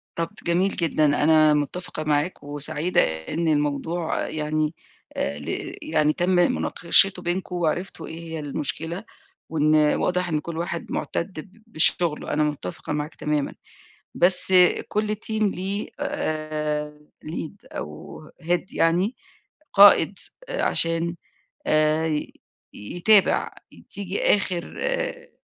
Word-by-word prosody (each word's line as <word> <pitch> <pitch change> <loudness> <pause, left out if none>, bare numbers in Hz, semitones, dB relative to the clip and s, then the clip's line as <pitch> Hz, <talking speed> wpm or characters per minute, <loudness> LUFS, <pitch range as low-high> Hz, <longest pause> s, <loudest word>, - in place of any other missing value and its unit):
طَب 165 0 -2 0.2
جميل 180 +3 +2
جدًا، 160 -2 +1 0.2
أنا 155 0 +5
مُتّفقة 155 +2 -2
معاك 150 +2 0
وسعيدة 150 +4 0
إن 80 - -2
الموضوع 155 +3 0
يعني 155 0 -1 0.4
آآ 70 - -2
ل 75 - -4
يعني 150 0 +2
تم 175 +3 0
مناقشته 180 +1 +3
بينكم 180 +1 -3
وعرفتوا 175 +2 -2
إيه 160 - -7
هي 165 -1 -6
المشكلة 155 +5 -3 0.5
وإن 155 -1 +2
واضح 175 +4 +2
إن 155 -2 0
كل 160 +2 -6
واحد 170 0 -4
مُعتَد 170 -1 -3
ب 205 +7 -13
بشُغله، 165 -4 +2
أنا 150 - +2
مُتّفقة 150 -5 -4
معاك 150 +1 -4
تمامًا. 150 -2 -1 0.6
بس 180 +1 +3 0.3
كل 210 0 -1
team 220 0 -3
ليه 195 +1 -2
آآ 150 -1 -3 0.3
lead 155 0 -5 0.2
أو 75 0 -8 0.2
head 175 +1 0
يعني، 180 +8 +2 0.6
قائد 200 -2 +7 0.3
عشان 165 - 0 0.5
آآ 155 0 +2 0.5
يتابع. 180 - +3 0.4
تيجي 200 -1 -3
آخِر 185 -4 -3
آآ - - -2
165 Hz, 115 wpm, -24 LUFS, 150-180 Hz, 0.6 s, قائد